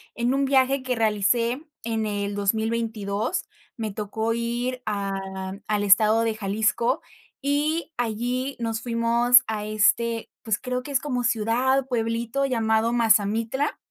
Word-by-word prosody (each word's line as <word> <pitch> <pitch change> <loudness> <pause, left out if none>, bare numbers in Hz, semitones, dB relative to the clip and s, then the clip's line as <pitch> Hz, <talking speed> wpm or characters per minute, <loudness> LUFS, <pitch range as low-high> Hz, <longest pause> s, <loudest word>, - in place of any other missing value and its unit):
en 240 +2 0
un 275 0 +1
viaje 270 0 +3
que 255 -1 -1
realicé 225 +3 +1 0.2
en 225 -1 -1
el 205 -1 -2
2022. 220 - -1 0.3
Me 220 -2 -3
tocó 220 +2 -2
ir 240 +2 -2
a 195 -2 -3
al 210 -1 0
estado 215 +2 +5
de 225 -1 0
Jalisco, 215 +3 0 0.4
y 300 +4 0
allí 245 +3 -2
nos 225 -1 -2
fuimos 235 +1 +4
a 215 -1 -3
este, 225 +2 +1
pues, 220 -2 0
creo 250 0 -3
que 285 - -8
es 270 - +2
como 250 -4 -2
ciudad, 245 +3 +1
pueblito 235 +2 -1
llamado 225 -2 +1
Mazamitla 225 +4 +2
230 Hz, 135 wpm, -24 LUFS, 215-250 Hz, 0.4 s, estado